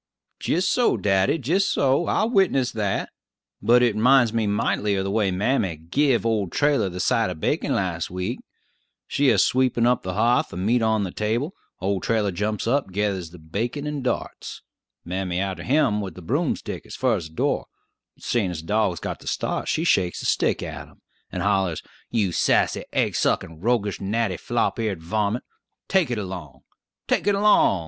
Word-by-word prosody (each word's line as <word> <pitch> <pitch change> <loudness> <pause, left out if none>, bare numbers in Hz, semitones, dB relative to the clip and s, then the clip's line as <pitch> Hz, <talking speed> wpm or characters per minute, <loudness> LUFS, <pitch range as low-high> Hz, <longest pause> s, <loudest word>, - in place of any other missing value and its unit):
"Jist 185 +4 +1
so, 245 -1 +2
daddy; 95 +6 +2
jist 170 - +1
so; 140 +4 +2
I'll 220 +2 +1
witness 155 - +2
that. 105 -3 -2 0.5
But 120 +1 +5
it 120 -4 +2
'minds 120 +1 +4
me 115 -2 +1
mightily 100 0 0
of 95 - 0
the 100 - -2
way 105 -2 +2
mammy 95 -1 0
give 120 - +1
old 105 -6 0
Trailler 145 -9 +2
the 90 - -6
side 115 +1 +2
of 90 -3 -6
bacon - - 0
last 85 -4 -2
week. 90 +7 -3 0.7
She 140 -1 +2
a 115 - +4
sweepin' 125 +3 +2
up 125 0 +3
the 95 - -4
h'a'th; 115 +5 +2
the - - -8
meat 115 +6 +1
on 110 -2 +2
the 95 - -3
table; 115 - -1 0.3
old 95 0 -1
Trailler 110 -3 +1
jumps 105 +4 -2
up, 120 -3 0
gethers 95 -3 -1
the 90 - -13
bacon, 110 - -4
and 150 -2 -3
darts! 125 - -4 0.4
Mammy 90 0 -2
arter 95 -1 -3
him 125 -7 +2
with 95 -5 -6
the 90 - -10
broom 145 - 0
stick - - -7
as - - -8
fur - - +1
as 80 - -6
the 80 - -20
door, - - 0 0.5
but - - -21
seein' 105 -7 0
the 80 -3 -5
dog 105 +1 +1
has 85 - -8
got - - -5
the - - -13
start, - - -2
she 160 - 0
shakes 90 - +2
the - - -6
stick - - +1
at - - -7
him, - - -22 0.3
and - - -3
hollers, 95 -5 +1 0.3
'You 105 -6 +1
sassy, - - +2
aigsukkin', 80 -1 0
roguish, 110 -2 0
gnatty, 100 -1 -1
flop - - -1
eared 100 -7 -2
varmint! 105 +5 -1 0.4
take 190 -7 +2
it 120 - -1
along! 90 -10 -6 0.5
take - - +1
it 205 - +4
along! 210 +1 +5
105 Hz, 190 wpm, -24 LUFS, 95-125 Hz, 0.7 s, But